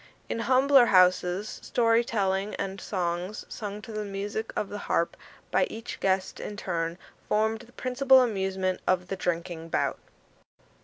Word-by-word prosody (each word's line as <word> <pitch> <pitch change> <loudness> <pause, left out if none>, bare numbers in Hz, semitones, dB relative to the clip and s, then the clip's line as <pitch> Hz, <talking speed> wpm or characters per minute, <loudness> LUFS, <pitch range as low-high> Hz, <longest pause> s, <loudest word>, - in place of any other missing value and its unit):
In - - -2
humbler 260 +1 +5
houses, 185 +2 +3
story 230 -1 +3
telling 200 -3 -1
and 195 -1 -4
songs, 180 +1 -3
sung 210 -1 -6
to 225 - -8
the 215 -1 -3
music 205 +2 -4
of 205 - -2
the 205 - -5
harp 170 - +1 0.4
by - - +3
each 225 +1 -7
guest 190 -1 0
in 205 - -6
turn, 170 -3 -2 0.3
formed 220 +1 +2
the 240 +1 -15
principal 260 +1 +4
amusement 190 -4 -1
of 180 -1 +1
the 195 - -1
drinking 170 -2 -3
bout. - - 0
200 Hz, 150 wpm, -27 LUFS, 185-225 Hz, 0.4 s, humbler